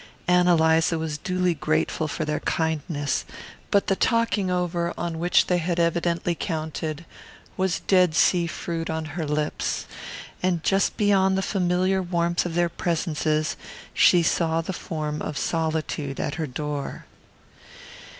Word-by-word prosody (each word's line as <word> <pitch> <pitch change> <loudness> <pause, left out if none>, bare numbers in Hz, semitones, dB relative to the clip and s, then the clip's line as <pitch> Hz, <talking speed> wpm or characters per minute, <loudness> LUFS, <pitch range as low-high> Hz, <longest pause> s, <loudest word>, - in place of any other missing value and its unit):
Ann 180 0 +4
Eliza 165 -1 +4
was 160 -2 -3
duly 180 +1 0
grateful 155 +1 0
for 155 +1 -3
their 150 0 -1
kindness, 155 -3 -1 0.5
but 200 - +3
the 195 - +1
"talking 230 -4 +1
over" 175 -1 -1
on 170 -2 -3
which 175 +1 +3
they 180 -1 +1
had 170 +1 -1
evidently 170 0 +1
counted 160 -2 -4 0.5
was 190 -2 0
Dead 180 -4 +3
Sea 175 0 +3
fruit 165 -1 -4
on 160 0 -2
her 160 -2 -3
lips; 150 0 -1 0.6
and 180 -3 0
just 195 0 +1
beyond 195 -2 +3
the 190 - 0
familiar 185 0 +1
warmth 175 -1 0
of 165 - -5
their 175 0 +3
presences 155 -2 -1 0.4
she 175 -1 +5
saw 165 0 +1
the 165 +3 -3
form 155 -3 -4
of 150 - -4
Solitude 155 -4 -2
at 150 - -2
her 160 -3 -3
door. 145 +1 -4
170 Hz, 140 wpm, -25 LUFS, 155-180 Hz, 0.6 s, she